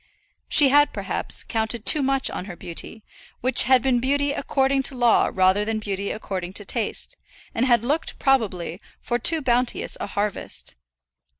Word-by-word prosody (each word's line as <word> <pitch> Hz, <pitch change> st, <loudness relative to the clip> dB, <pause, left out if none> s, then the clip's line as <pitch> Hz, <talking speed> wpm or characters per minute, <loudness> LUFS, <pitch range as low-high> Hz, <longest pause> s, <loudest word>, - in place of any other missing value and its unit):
She 285 Hz, -3 st, +6 dB
had, 290 Hz, +2 st, +4 dB
perhaps, -, -, -1 dB
counted 225 Hz, 0 st, -2 dB
too 305 Hz, -, +5 dB
much 270 Hz, 0 st, 0 dB
on -, -, -5 dB
her 185 Hz, -3 st, -8 dB
beauty, 175 Hz, +6 st, -7 dB, 0.4 s
which 255 Hz, +2 st, +3 dB
had 255 Hz, -1 st, +4 dB
been 260 Hz, -2 st, +2 dB
beauty 285 Hz, +3 st, 0 dB
according 270 Hz, -1 st, 0 dB
to 265 Hz, -, -11 dB
law 240 Hz, -2 st, +3 dB
rather 190 Hz, +2 st, +2 dB
than 220 Hz, +1 st, -2 dB
beauty 200 Hz, -2 st, -4 dB
according 185 Hz, -4 st, -5 dB
to 205 Hz, -, -5 dB
taste, 225 Hz, +1 st, -3 dB, 0.4 s
and 245 Hz, +4 st, 0 dB
had 240 Hz, -2 st, +3 dB
looked, 300 Hz, +5 st, -1 dB
probably, 200 Hz, -, 0 dB, 0.2 s
for 240 Hz, 0 st, -2 dB
too 315 Hz, +5 st, +2 dB
bounteous 245 Hz, -1 st, 0 dB
a -, -, -4 dB
harvest. 205 Hz, 0 st, -4 dB
240 Hz, 165 wpm, -23 LUFS, 205-270 Hz, 0.4 s, She